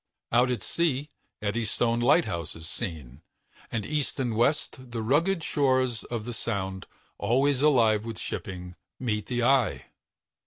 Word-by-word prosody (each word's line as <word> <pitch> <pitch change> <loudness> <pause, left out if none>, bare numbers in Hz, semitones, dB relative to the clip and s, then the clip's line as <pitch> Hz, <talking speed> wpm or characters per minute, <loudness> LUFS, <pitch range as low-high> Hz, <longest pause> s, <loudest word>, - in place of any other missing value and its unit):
Out 125 +2 +4
at 125 - -1
sea, 150 -3 0 0.3
the 105 - 0
Eddystone 115 +2 0
Lighthouse 120 - +2
is 80 0 -6
seen, 80 - -5 0.5
and 110 -3 -2
east 150 -3 -2
and 120 -4 0
west 130 +1 0
the 115 -2 -3
rugged 165 - +2
shores 130 -6 +1
of 115 -3 -4
the 120 - -4
Sound, 95 -5 -3 0.3
always 135 +3 +2
alive 115 -8 +4
with 115 -1 -6
shipping, 90 -2 -5 0.3
meet 105 -5 -1
the 120 -1 -1
eye. 130 -1 +3
120 Hz, 145 wpm, -27 LUFS, 105-135 Hz, 0.5 s, Out